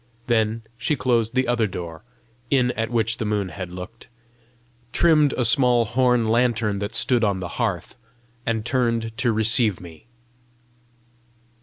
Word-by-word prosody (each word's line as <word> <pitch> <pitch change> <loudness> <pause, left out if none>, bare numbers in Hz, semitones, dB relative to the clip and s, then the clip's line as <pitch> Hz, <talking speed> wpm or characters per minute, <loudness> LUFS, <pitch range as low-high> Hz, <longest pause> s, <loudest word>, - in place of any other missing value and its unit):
Then 115 -1 0 0.2
she 150 +4 0
closed 120 -3 0
the 130 0 +1
other 120 -2 +1
door, 85 -4 -7 0.5
in 125 -3 +2
at 115 -1 -3
which 115 -1 0
the - - -3
moon 105 -3 -1
had 90 +1 -7
looked, 90 +6 -10 0.8
trimmed 150 -2 +4
a 125 - 0
small 125 -4 +3
horn 125 0 +2
lantern 110 -3 +1
that 100 +2 -5
stood 115 +2 +2
on 100 -3 +1
the 90 - -4
hearth, 95 -7 -2 0.5
and 115 -2 -2
turned 115 -3 -1
to 120 - +2
receive 110 -2 +3
me. 85 +2 -13
115 Hz, 145 wpm, -23 LUFS, 105-125 Hz, 0.8 s, trimmed